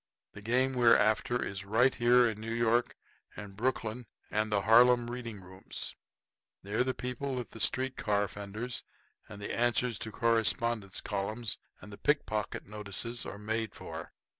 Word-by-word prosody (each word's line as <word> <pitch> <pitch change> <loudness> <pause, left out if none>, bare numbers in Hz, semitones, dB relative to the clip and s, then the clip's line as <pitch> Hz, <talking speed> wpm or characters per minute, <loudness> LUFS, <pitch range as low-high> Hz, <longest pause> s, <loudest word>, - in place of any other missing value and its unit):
The 100 - -10
game 125 +5 +2
we're 120 -2 +6
after 115 +3 +1
is 100 0 -5
right 115 +6 +3
here 120 0 +5
in 110 -1 -4
New 115 +1 -4
York 115 +1 +2 0.4
and 100 -2 -8
Brooklyn 115 0 -2 0.2
and 110 0 0
the 100 -1 +2
Harlem 120 +3 +6
reading 115 -5 -6
rooms. 95 +1 -6 0.7
They're 105 +5 +1
the 130 0 -1
people 125 +2 -3
that 125 -2 -5
the 115 - -10
street 130 +3 +1
car 105 -1 +1
fenders 105 +5 -5 0.5
and 105 - -9
the 100 - -4
Answers 120 -1 +1
to 110 - -5
Correspondents 115 -2 +1
columns 105 +2 -3 0.2
and 105 - -11
the - - -10
pickpocket 110 -8 0
notices 105 +3 -4
are - - -6
made 110 +1 -2
for. - - -7
115 Hz, 160 wpm, -31 LUFS, 105-120 Hz, 0.7 s, we're